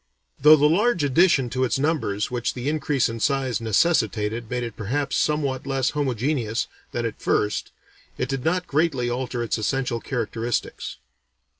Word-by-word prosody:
Though 150 +3 +9
the 150 -1 +3
large 190 +2 +2
addition 140 -3 +3
to 130 0 0
its 130 - +1
numbers 135 -9 -1
which 120 -1 -2
the 125 +1 -4
increase 145 -3 +1
in 115 0 -5
size 135 -1 0
necessitated 110 - +1
made 125 0 -2
it 115 -2 -5
perhaps 135 +7 -2
somewhat 140 -3 0
less 135 -1 0
homogeneous 130 -4 -1 0.3
than 120 -1 -2
at 115 - -5
first, 105 0 0 0.5
it - - -1
did 135 -2 -3
not 180 +2 +1
greatly 140 -5 0
alter 125 -1 -2
its 115 - -1
essential 125 +2 -1
characteristics. 120 -2 -3
130 Hz, 155 wpm, -24 LUFS, 115-145 Hz, 0.5 s, Though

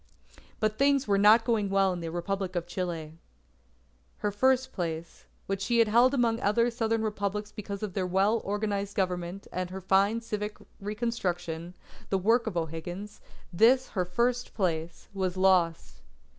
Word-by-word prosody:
But 215 0 0
things 280 0 +3
were 200 -1 +3
not 215 +3 +6
going 220 -4 +1
well 195 -1 +3
in 180 - -5
the 165 -1 -4
Republic 185 +2 -3
of 170 -1 -1
Chile. 170 -3 -5 1.0
Her 210 - -1
first 260 +4 +2
place, 165 -2 -5 0.2
which 195 0 -3
she 235 +5 +1
had 230 -1 +5
held 245 +5 +5
among 230 -3 +2
other 230 +3 +2
southern 225 -1 0
Republics 210 -1 -2
because 200 -1 -6
of 205 -4 -4
her 185 -2 -1
well 195 +5 +2
organized 200 -1 -2
Government 180 0 -2
and 180 0 -3
her 190 +1 -6
fine 195 +4 +2
civic 210 -2 -4 0.2
reconstruction, 180 -6 -3 0.3
the 195 - +2
work 225 +5 +2
of 190 -5 -2
O'Higgins, 170 +5 -5 0.3
this 250 +8 +4
her 185 - -1
first 240 +7 -1
place, 170 -4 -2
was 190 -2 -2
lost. 185 -3 +2
200 Hz, 155 wpm, -28 LUFS, 180-225 Hz, 1.0 s, not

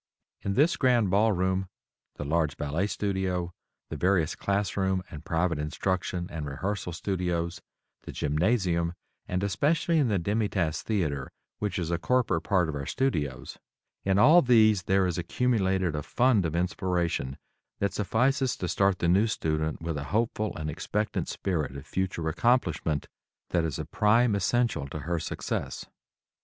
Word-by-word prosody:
In 100 0 -2
this 155 +5 +3
Grand 120 -7 +3
Ball 105 +3 +4
Room, 95 0 0 0.5
the 75 - -5
large 75 -1 0
Ballet 75 +7 -1
studio, 95 -4 -2 0.4
the - - -4
various 90 -4 +2
classroom 95 -2 0
and 75 - -8
private 85 -1 0
instruction 90 +3 -2
and 80 -2 -4
rehearsal 90 +6 -3
studios, 85 -1 -2 0.4
the - - -8
gymnasium, 85 +2 +1 0.3
and 90 +1 -1
especially 150 - +2
in 140 - +3
the 105 -3 +1
Demi 105 +4 0
Tasse 85 -6 -1
Theatre, 80 -11 -1 0.3
which 105 -2 -2
is 85 -2 -2
a 85 - 0
corporate 115 -6 +1
part 95 -5 +2
of 80 - -3
our 70 -1 -4
studios, 75 - -2 0.4
in 95 0 +2
all 150 +11 +7
these 110 - +5
there 95 0 +3
is 90 -2 -1
accumulated 95 -5 +1
a 75 - -2
fund 115 - +2
of 80 - -4
inspiration 85 -6 -1 0.4
that 100 -2 -1
suffices 125 +6 +1
to 90 - -3
start 100 +1 +2
the 85 - 0
new 95 +6 +4
student 80 -5 -2
with 80 -2 -2
a 70 - -5
hopeful 110 +3 -1
and 80 - -4
expectant 105 +6 -2
spirit 75 -8 -2
of 70 - -9
future 90 -4 -2
accomplishment 80 - +1 0.4
that 85 -2 +2
is 80 -3 -2
a - - -4
prime 115 +2 +3
essential 100 - +1
to 75 +2 -6
her 85 +3 -1
success. - - -4
95 Hz, 155 wpm, -28 LUFS, 80-105 Hz, 0.5 s, all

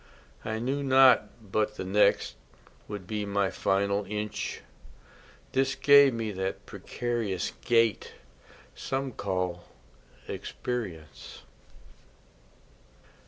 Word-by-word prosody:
I 110 0 -3
knew 130 +5 -2
not 130 -3 +6 0.2
but 105 0 0
the 95 - -5
next 100 +3 +2 0.5
Would 105 -3 -7
be 105 +2 -3
my 100 -1 0
final 100 +1 0
inch, 105 +1 -4 0.9
This 135 0 +1
gave 140 -1 +7
me 115 -2 -3
that 95 0 -4
precarious 115 -6 -3
gait 115 -4 +2 0.6
Some 135 0 -3
call 90 -4 -3 0.6
experience. 90 -12 -6
105 Hz, 90 wpm, -28 LUFS, 95-125 Hz, 0.9 s, gave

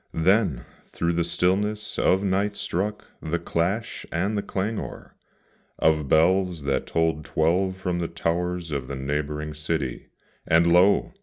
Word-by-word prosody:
Then 85 - +2 0.2
through 85 0 -1
the 85 0 +1
stillness 100 +5 0
of 95 +2 +3
night 100 +1 0
struck 105 +4 -2 0.2
the 80 +2 -1
clash 90 +7 -2
and 95 +6 0
the 100 - 0
clangor 100 +3 -4 0.6
Of 80 -2 +2
bells 90 +1 +3
that 70 -2 -1
told 80 -2 0
twelve 90 +6 +1
from 90 -2 -2
the 85 - -1
towers 85 +1 -2
of 70 -3 -3
the 70 - -5
neighbouring 75 +2 -3
city; 75 -4 -3 0.4
And 80 +1 +5
lo! 95 +3 +4
85 Hz, 140 wpm, -25 LUFS, 80-95 Hz, 0.6 s, And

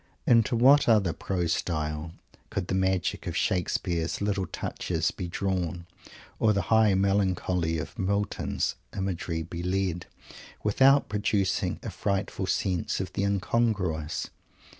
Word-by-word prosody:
Into 115 -1 +4
what 135 +4 +6
other 100 -7 +4
prose 90 -3 -1
style 75 -1 -3 0.4
could 95 -3 -3
the - - 0
magic 95 -1 0
of - - -2
Shakespeare's 85 -2 0
"little 100 -2 -1
touches" 80 -2 -2
be 90 - -5
drawn, 90 -1 -2 0.5
or 110 -1 +4
the 100 - +1
high 110 -3 +5
melancholy 95 -4 +1
of 80 +9 -6
Milton's 100 +1 -1 0.2
imagery 90 -3 -2
be 85 +1 -6
led, 90 -1 -1 0.6
without 135 +7 +4
producing 105 -1 0
a - - -4
frightful 100 -2 -2
sense 90 -4 0
of 95 -1 -4
the - - -1
incongruous? 95 -6 0
95 Hz, 125 wpm, -27 LUFS, 85-100 Hz, 0.6 s, what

